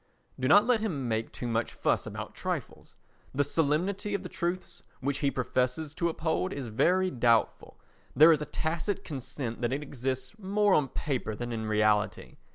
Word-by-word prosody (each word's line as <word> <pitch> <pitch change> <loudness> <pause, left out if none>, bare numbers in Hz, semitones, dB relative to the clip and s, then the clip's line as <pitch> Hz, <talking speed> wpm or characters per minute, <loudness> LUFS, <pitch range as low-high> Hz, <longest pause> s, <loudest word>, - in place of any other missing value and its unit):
Do 130 - +1
not 205 +9 +7
let 245 -2 +3
him 160 - -2
make 110 -1 -1
too 120 - -5
much 115 0 -1
fuss - - 0
about - - -6
trifles. - - -5 0.4
The 145 - +3
solemnity 170 +8 0
of 200 - -3
the 180 - -6
truths 175 +2 -3 0.2
which 140 +1 -1
he 140 - +2
professes 130 +3 -1
to 170 +1 0
uphold 165 +3 -1
is 130 -5 -5
very 185 +11 +2
doubtful; 115 -2 +1 0.4
there 155 +3 +8
is 155 -2 +3
a - - -2
tacit 170 +5 -2
consent 130 -4 -5
that 120 +1 0
it 145 +2 -2
exists 130 - -4
more 205 0 +2
on 145 -3 +3
paper 130 -5 -3
than 120 +2 -5
in 110 -1 -3
reality. 105 -1 +1
145 Hz, 175 wpm, -29 LUFS, 120-175 Hz, 0.4 s, there